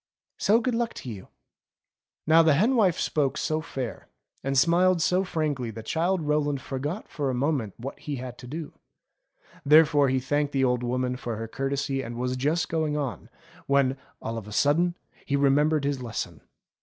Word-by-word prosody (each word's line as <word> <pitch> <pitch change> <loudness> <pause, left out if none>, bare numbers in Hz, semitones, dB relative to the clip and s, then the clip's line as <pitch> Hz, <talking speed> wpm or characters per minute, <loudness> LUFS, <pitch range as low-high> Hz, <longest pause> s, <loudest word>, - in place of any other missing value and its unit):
So 215 +3 +4
good 245 +1 -1
luck 230 0 -1
to 125 - -7
you 95 -4 -9 0.5
!'* - - -67
Now 160 +1 +6
the 160 -3 +4
hen 225 - +3
wife 195 -8 +3
spoke 145 -2 0
so 155 0 -1
fair, 135 -7 -6 0.4
and 135 0 0
smiled 175 +5 +4
so 180 +3 +2
frank 155 -6 -1
that 115 -2 -5
Childe 175 +2 0
Rowland 145 -1 +1
forgot 145 - -4
for 145 -3 -2
a 130 - -1
moment 130 -6 -1
what 130 +4 -7
he 150 - -4
had 125 -1 -7
to 125 - -10
do. 155 +3 -6 0.9
Therefore 150 -1 +5
he 130 0 +2
thanked 145 +2 -1
the 135 -1 +2
old 125 -1 +2
woman 125 +1 -1
for 120 -2 -4
her 115 +1 -5
courtesy 135 +2 -2
and 120 -2 -6
was 125 +1 -1
just 150 +6 0
going 155 -2 -1
on, 135 -9 -4 0.4
when, 140 -1 +3 0.3
all 115 0 -3
of 105 - -12
a - - -9
sudden, 165 +9 +2 0.3
he 140 - -1
remembered 145 +2 +3
his 140 -2 -1
lesson. 115 -3 -5
140 Hz, 185 wpm, -26 LUFS, 130-160 Hz, 0.9 s, Now